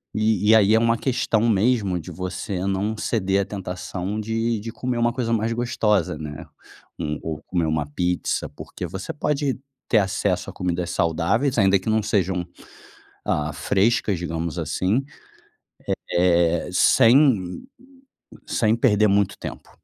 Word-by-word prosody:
e 110 -1 +3
aí 105 0 +5
é 110 - +5
uma 115 0 +2
questão 120 -4 0
mesmo 100 -3 +2
de 85 +2 -9
você 90 +2 -4
não 100 +3 -1
ceder 100 -4 0
à - - -2
tentação 95 +1 -5
de 115 +1 -1
de 115 +2 -6
comer 125 +1 -3
uma 120 0 +2
coisa 115 -2 -1
mais 115 0 0
gostosa, 110 -8 0
né. 75 +1 -7 0.5
Hum, 75 -2 -3
ou 80 -2 -4
comer 85 -3 0
uma 75 -1 0
pizza, 90 +4 -1
porque - - -8
você 95 +1 -6
pode 145 -3 -1 0.3
ter 115 - +4
acesso 95 -1 -1
a - - -9
comidas 90 -1 -2
saudáveis, 85 - +1
ainda 100 -2 +4
que 95 - -4
não 110 0 +2
sejam, 95 -3 0 0.8
ah, 75 0 -1
frescas, 100 +1 +1
digamos 85 -2 -4
assim, 100 +8 0 1.1
eh, 85 -1 +3
sem 115 - +4 0.8
sem 110 -1 +2
perder 110 -3 +3
muito 100 -1 +1
tempo. - - -8
100 Hz, 140 wpm, -23 LUFS, 90-115 Hz, 1.1 s, aí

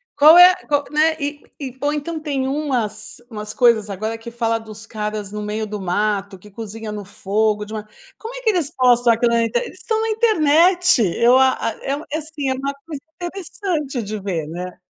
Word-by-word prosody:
qual 305 +3 +8
é 360 +1 +9
qual, 290 -1 +1
né, 315 +1 +3
e 290 +1 -4 0.2
e 260 -3 -7
ou 290 +2 0
então 315 +2 -4
tem 280 -4 -2
umas 250 -7 -2
umas 210 -2 -6
coisas 225 -4 +3
agora 215 +4 -3
que 230 +1 -9
fala 230 -1 0
dos 220 0 -11
caras 210 -2 -4
no 210 0 -5
meio 215 +1 -3
do 210 0 -5
mato 200 +1 -1
que 210 - -15
cozinha 220 +1 -7
no 210 -1 -6
fogo 210 +2 0
de 210 +1 -9
uma 215 -1 -6 0.3
Como 455 +2 -8
é - - -7
que 480 - +2
eles 335 -7 0
postam 245 -2 +4
aquilo 235 +1 +1
na 230 0 +3
internet? 485 - -1
Eles - - -12
estão 440 -1 -1
na 450 - -1
internet 360 - +4 0.2
eu 245 +2 +5
a 265 0 +5 0.2
a - - -5
eu 285 +3 -4
assim 305 -2 -3
é - - +1
uma 275 +2 -3
coisa 300 -4 -6 0.2
interessante 345 - -3
de 215 0 -5
ver, 180 -6 -3
né? 180 +3 -7
245 Hz, 205 wpm, -20 LUFS, 215-300 Hz, 0.3 s, é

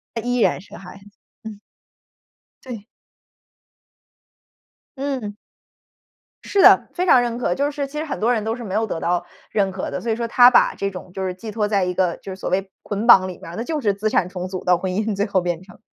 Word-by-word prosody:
她 230 - -2
依 245 +1 -1
然 215 - +2
是 205 - -14
孩 195 +1 -12
子， 195 - -20 0.4
嗯。 215 -2 -8 1.1
对。 230 -5 -8 2.1
嗯。 260 -7 -3 1.1
是 400 - +2
的， - - +7
非 360 - -1
常 255 -8 +6
认 235 -1 -2
可， 180 -7 -1
就 285 +1 0
是 280 -1 -3
其 300 +2 -9
实 305 - -1
很 310 - -5
多 235 +3 +2
人 220 - -1
都 220 +1 -1
是 245 - -8
没 190 - -6
有 220 +1 +1
得 170 -6 -4
到 175 0 -1 0.2
认 195 -3 0
可 190 - -4
的， - - -4
所 230 - -2
以 - - +1
说 235 0 -3
她 245 +1 +7
把 - - +4
这 200 0 -2
种， 180 -1 -10
就 190 0 -3
是 185 - -2
寄 215 +4 -9
托 210 -1 -1
在 200 -3 +1
一 180 - -2
个， 180 -2 0
就 195 - -9
是 - - -8
所 190 - -5
谓 195 +1 -1
捆 210 +3 -3
绑 190 -5 +8
里 180 - -8
面 - - -11
儿， - - -8
那 225 - -3
就 310 +4 -2
是 210 -7 +1
资 215 +2 -1
产 180 - +1
重 180 0 -5
组 185 -1 -5
到 180 -1 +4
婚 185 +1 -3
姻 210 +2 -1
最 200 +1 0
后 200 -2 +1
变 175 -1 -2
成。 185 -1 -17
205 Hz, 255 characters per minute, -21 LUFS, 185-235 Hz, 2.1 s, 绑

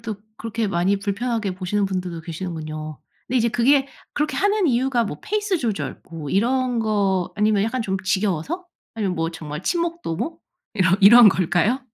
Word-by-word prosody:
또 220 -2 -5 0.2
그렇게 225 0 -3
많이 195 +1 +1
불편하게 210 0 -2
보시는 190 +2 -1
분들도 180 -3 -4
계시는군요. 155 -3 -6 0.3
근데 255 - -1
이제 235 0 +2
그게 270 +4 +3 0.2
그렇게 300 -2 -1
하는 405 -1 +2
이유가 250 -2 +2
뭐 150 -8 -5
페이스 415 -3 -1
조절 225 -8 -3
뭐 160 -4 -6
이런 250 +4 +1
거 200 -4 0
아니면 210 -1 +2
약간 230 +3 -1
좀 190 -3 -1
지겨워서? 195 - -1 0.3
아니면 200 -5 -1
뭐 165 -1 -1
정말 155 -1 -7
친목 340 0 -1
도모? 320 - -4 0.3
이런 185 -2 +3
이런 220 +3 +9
걸까요? 190 +7 +1
210 Hz, 360 characters per minute, -22 LUFS, 185-250 Hz, 0.3 s, 이런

